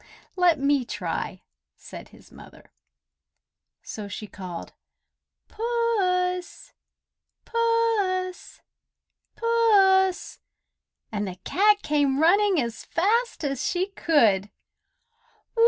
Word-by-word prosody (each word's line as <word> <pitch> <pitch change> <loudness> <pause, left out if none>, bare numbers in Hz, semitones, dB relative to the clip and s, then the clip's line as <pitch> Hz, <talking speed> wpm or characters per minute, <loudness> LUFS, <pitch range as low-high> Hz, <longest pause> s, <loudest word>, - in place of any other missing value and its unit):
"Let 355 -3 +3
me 280 -1 +1
try!" - - -5 0.3
said - - -11
his - - -19
mother. - - -16 1.1
So 210 -2 -7
she 200 +2 -7
called, 185 -4 -9 0.7
"Puss! 390 -6 -1 0.7
Puss! 455 -6 -1 0.7
Puss!" 395 -5 +2 0.7
and 205 -2 -3
the 185 - -6
cat 415 +2 +2
came 285 -2 +1
running 380 +3 +4
as 235 -3 -4
fast 450 +5 0
as 275 -3 -2
she 370 +2 -1
could. 220 - +2
365 Hz, 85 wpm, -25 LUFS, 275-420 Hz, 1.1 s, running